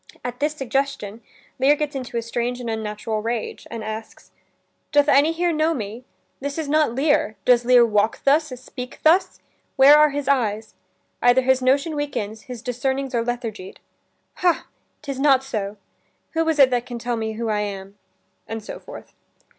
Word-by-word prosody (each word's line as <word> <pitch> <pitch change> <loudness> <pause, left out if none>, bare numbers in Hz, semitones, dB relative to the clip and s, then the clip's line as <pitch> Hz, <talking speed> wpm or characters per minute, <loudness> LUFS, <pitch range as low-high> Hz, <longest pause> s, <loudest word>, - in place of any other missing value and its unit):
At 245 0 -5
this 300 +1 0
suggestion, 270 -5 -2 0.4
Lear 275 +3 +5
gets 295 -1 -3
into 255 -3 -5
a 230 - -1
strange 240 +1 -2
and 245 - -6
unnatural 215 0 -3
rage, 230 0 -4
and 230 -2 -6
asks: 220 +1 -8 0.6
"Doth 290 0 +4
any 290 +3 +5
here 345 +1 0
know 315 +1 +1
me? 225 +2 -6 0.3
This 285 +2 -4
is 320 -2 -3
not 300 -5 +2
Lear: 275 -6 +1
Does 245 -1 +4
Lear 245 -1 +6
walk 215 -1 0
thus? 295 +3 +4
speak 250 0 -8
thus? 335 +5 +3 0.4
Where 275 +2 +8
are 300 0 +6
his 285 0 -4
eyes? 220 -5 0 0.5
Either 245 +1 +5
his 260 0 +3
notion 280 +5 +2
weakens, 220 -7 -4
his 245 -2 -7
discernings 265 +2 -2
Are 235 -1 +1
lethargied. 230 -5 -5 0.6
Ha! 355 -2 +1 0.4
'tis 275 -3 -5
not 270 -2 +4
so. 210 -5 -4 0.5
Who 325 0 0
is 320 - +1
it 270 -2 +6
that 245 -1 0
can 240 - -5
tell 240 +1 -2
me 220 -1 -3
who 225 +1 -3
I 210 -1 +1
am?" 200 -1 -6 0.5
And 225 -1 -5
so - - -8
forth. - - -12
250 Hz, 175 wpm, -22 LUFS, 225-285 Hz, 0.6 s, Where